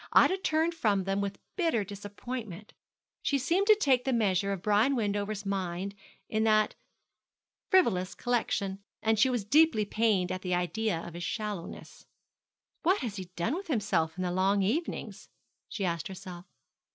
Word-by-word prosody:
Ida 380 - +5
turned 320 -1 +1
from 210 - +1
them 195 +1 -1
with 200 0 -3 0.2
bitter 325 - +1
disappointment. 205 0 -7 0.5
She 280 - +1
seemed 345 +9 +1
to 430 - +8
take 270 - +2
the 265 - 0
measure 200 -5 +1
of 195 -2 -4
Brian 215 +6 +3
Wendover's 205 -2 -2
mind 190 0 -2 0.3
in 220 0 0
that 215 -1 +3 1.0
frivolous 185 - +3
collection, 210 -5 -1 0.2
and 220 -1 +2
she 260 - +5
was 240 -5 -1
deeply 290 -3 +4
pained 205 -4 +1
at 185 - -3
the 180 -1 0
idea 180 +1 -1
of 170 - -9
his 175 0 -6
shallowness. 210 -3 -5 0.7
'What 370 +5 +2
has 225 -5 -4
he 190 - -5
done 170 - 0
with 380 +4 -4
himself 195 - 0
in 185 - -2
the 180 - -1
long 195 +2 +2
evenings?' 280 - -3 0.4
she 200 - -3
asked 170 -3 -2
herself. 185 -2 -9
205 Hz, 160 wpm, -30 LUFS, 190-245 Hz, 1.0 s, to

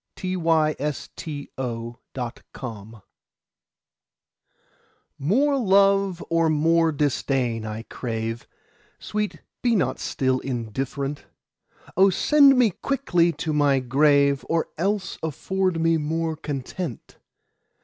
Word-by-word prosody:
Against 160 -5 0 0.2
Indifference 120 -4 -7 2.2
MORE 265 - +2
love 195 -3 +3
or 165 -1 +2
more 165 +2 +3
disdain 130 -6 0
I 110 +1 -5
crave; 115 -1 -4 0.5
Sweet, 210 -1 -4 0.2
be 240 -2 +2
not 130 - 0
still 130 -1 0
indifferent: 135 +4 -4 0.7
O 195 +2 +6
send 275 - +5
me 240 -4 +4
quickly 180 -8 +1
to 160 -1 -3
my 145 -2 +3
grave, 140 +2 +3
Or 165 -1 0
else 195 +3 -1
afford 185 +3 -1
me 165 0 +3
more 160 +1 -1
content! 145 - -6
155 Hz, 90 wpm, -24 LUFS, 130-185 Hz, 2.2 s, O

